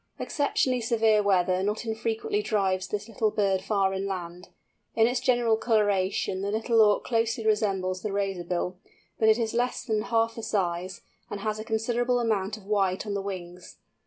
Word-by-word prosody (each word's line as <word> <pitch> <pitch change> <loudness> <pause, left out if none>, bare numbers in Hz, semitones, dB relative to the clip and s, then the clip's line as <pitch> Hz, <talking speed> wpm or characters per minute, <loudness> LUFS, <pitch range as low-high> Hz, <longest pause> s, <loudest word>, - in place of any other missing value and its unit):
Exceptionally 260 -4 0
severe 225 -2 +3
weather 185 -2 +2
not 210 +4 -2
unfrequently 425 - -2
drives 190 - 0
this 210 +1 -4
little 220 -1 0
bird 195 -3 +1
far 195 -1 +1
inland. 180 -2 -5 0.5
In 225 - +5
its 245 +2 +1
general 240 -3 +2
colouration 200 -4 +1
the 200 - -2
Little 225 +2 +2
Auk 210 -1 +4
closely 230 -1 0
resembles 195 -4 0
the 210 - -3
Razorbill, 180 -2 -2 0.4
but 220 - +4
it 220 - +5
is 225 -2 -1
less 245 +2 -1
than 220 -4 0
half 230 +1 +1
the 230 - -7
size, 185 -4 -2 0.3
and 200 - -5
has 215 0 -2
a - - -4
considerable 240 +3 0
amount 215 -3 -1
of 205 - -15
white 195 -2 0
on 205 - -3
the 200 - -1
wings. 180 -2 -8
210 Hz, 170 wpm, -27 LUFS, 190-225 Hz, 0.5 s, In